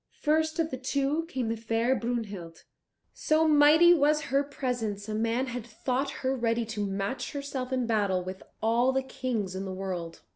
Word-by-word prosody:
First 315 +1 +1
of 325 -1 0
the 260 - -4
two 280 +4 0
came 255 -8 -2
the 230 - 0
fair 230 +2 +1
Brunhild. 210 -9 -4 0.5
So 315 +1 +2
mighty 310 +3 +7
was 300 -1 +3
her 275 +1 +4
presence, 240 -7 -3
a 215 - -3
man 230 +4 0
had 245 -2 -5
thought 250 +4 -2 0.2
her 265 +1 +2
ready 230 -1 0
to 210 -1 -2
match 195 +6 -3
herself 280 -3 -4
in 255 -2 0
battle 200 -5 +1
with 185 +1 -7 0.2
all 235 +3 +3
the 265 0 0
Kings 240 -7 -3
in 190 +1 -4
the 190 - -5
world. 185 -3 -5
245 Hz, 180 wpm, -28 LUFS, 215-280 Hz, 0.5 s, mighty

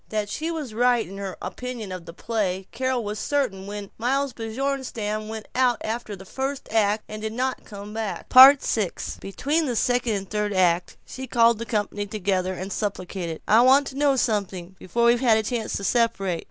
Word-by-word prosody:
That 210 -1 -2
she 315 +9 -3
was 305 -9 -4
right 245 0 +2
in 195 +2 -9
her 195 -2 -5
opinion 245 -5 -6
of 180 -2 -7
the - - -6
play 190 -3 -2
Carol 260 -1 -1
was 210 0 -4
certain 210 -10 -1
when 205 -1 -7
Miles 270 +3 0
Bjornstam 225 -3 -3
went 220 -1 -7
out 250 -2 +3
after 220 -1 -4
the 190 0 -12
first 270 +6 -4
act, 215 -1 +2
and 215 0 -7
did 220 0 -3
not 255 +2 -2
come 205 0 -9
back. 220 -2 -4
VI 265 +3 +11 0.6
Between 290 +11 -1
the 245 - -1
second 245 0 +1
and 195 -1 -4
third 210 0 -1
acts 180 -2 +1
she 265 0 -7
called 230 -2 +4
the 230 - -5
company 205 -2 -2
together, 185 -2 -1
and 190 +2 -5
supplicated, 185 -5 -4
"I 220 +3 +6
want 265 +3 +6
to 265 - -11
know 280 -1 +3
something, 195 -7 -1
before 235 +6 0
we 235 +1 +5
have 235 -3 +4
a 220 - 0
chance 230 0 -3
to - - -4
separate. 195 -6 +1
220 Hz, 195 wpm, -24 LUFS, 200-250 Hz, 0.6 s, VI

